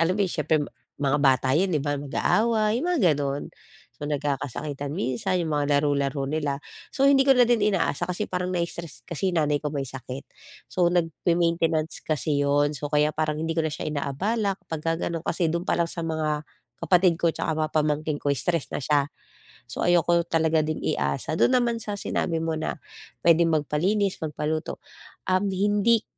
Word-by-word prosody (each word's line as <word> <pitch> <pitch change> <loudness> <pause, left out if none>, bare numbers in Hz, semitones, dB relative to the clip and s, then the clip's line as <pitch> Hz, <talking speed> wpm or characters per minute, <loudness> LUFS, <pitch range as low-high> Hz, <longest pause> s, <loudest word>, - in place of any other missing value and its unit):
alam 175 +3 +2
mo - - -2
yun 185 - -3
siyempre 155 0 +1 0.4
mga 145 0 +1
bata 130 -2 +3
yun 185 -1 +1
di 150 - +1
ba, 145 0 -1
mag-aaway 215 - +1
yung 330 - -2
mga 355 -4 +1 0.2
gano'n. 140 0 -2 0.5
So 145 - -7
nagkakasakitan 145 0 -3
minsan 150 - -1
yung 160 - -3
mga 145 -1 +2
laro-laro 140 -1 0
nila, 145 -1 -1 0.4
so 270 - 0
hindi 275 -1 +6
ko - - +5
na 250 - +6
din 235 -3 +2
inaasa 185 -5 +1
kasi 180 +4 -2
parang 180 0 -2
nai-stress 170 -2 -4
kasi- 185 +2 -1
nanay 150 -3 +2
ko- 150 - -2
may 140 -1 -2
sakit, 130 +1 -7 0.4
so 180 -1 +1
nagme-maintenance 165 -1 0
kasi 150 -1 0
yun. 145 +1 +2
So 145 - -4
kaya 150 0 +3
parang 155 -1 -1
hindi 165 +1 -2
ko 165 - +1
na 155 - -1
siya - - -5
inaabala 195 - -1
kapagka 165 +1 -2
gano'n, 165 -2 -3
kasi 170 0 +1
do'n 170 +1 -1
pa - - +2
lang 170 - +2
sa 170 - -4
mga 155 -2 -1 0.4
kapatid 180 -1 +4
ko 170 - +4
'tsaka 160 0 -2
mga 155 0 -1
pamangkin 155 -1 0
ko 145 0 0
stress 165 +3 0
na - - -3
siya, 145 0 +2 0.6
so - - -7
ayoko 175 0 +3
talaga 160 -1 +2
din 155 0 -2
iasa. 70 - -1
Do'n 255 +10 +3
naman 235 -2 +1
sa 210 -2 -4
sinabi 170 -4 -1
mo 165 0 -1
na 155 0 -3 0.5
puwedeng 170 0 +5
magpalinis, 175 +6 0
magpaluto, 155 0 -3 0.5
um, 185 +1 +2
hindi 205 +4 +2
160 Hz, 180 wpm, -25 LUFS, 145-180 Hz, 0.6 s, hindi